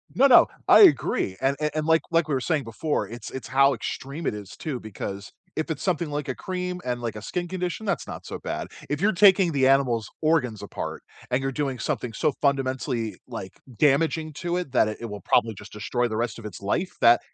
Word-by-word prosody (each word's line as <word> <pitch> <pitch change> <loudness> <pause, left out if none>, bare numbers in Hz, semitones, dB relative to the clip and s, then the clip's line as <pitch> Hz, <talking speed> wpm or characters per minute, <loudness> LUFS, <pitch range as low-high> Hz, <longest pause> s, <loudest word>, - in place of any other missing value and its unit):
No, 275 +2 +6
no, 245 - +8 0.2
I - - +8
agree, 310 - +4
and 135 +1 +1
and 150 0 -1
like 160 0 +4
like 165 -1 +3
we 150 - -1
were 130 - +1
saying 155 0 0
before, 115 -1 -2
it's 120 +3 -8
it's 130 -4 -7
how 135 +1 +5
extreme 140 +6 -5
it - - 0
is 105 -1 -8
too, 140 -6 -4
because 100 -1 -7 0.2
if 160 +1 -2
it's 155 -3 -3
something 170 -4 0
like 145 -1 -3
a 130 - -2
cream 180 +2 -4
and 120 -1 -2
like 115 -2 -3
a 105 - -7
skin 175 - -3
condition, 180 +3 -3
that's 195 -4 -1
not - - -8
so - - -6
bad. - - -4 0.2
If 145 +3 -2
you're 215 +2 +4
taking 190 -2 +5
the 135 -2 +3
animal's 125 -6 +2
organs 135 -9 +1
apart - - -6 0.3
and 125 - +2
you're 135 0 -1
doing 135 -2 -2
something 120 -2 -2
so 155 +6 +1
fundamentally, 130 -4 0
like, 115 -6 -7 0.2
damaging 155 +3 +2
to 175 +4 -2
it 175 -8 -4
that 110 - +4
it 105 - -4
it - - -4
will 105 -2 -7
probably 115 +4 +2
just 105 +1 -12
destroy 120 +3 -1
the 110 - -4
rest 115 -1 -2
of 110 - -11
its 100 -2 -8
life, 170 - -1
that 120 +1 +7
135 Hz, 225 wpm, -25 LUFS, 115-160 Hz, 0.3 s, no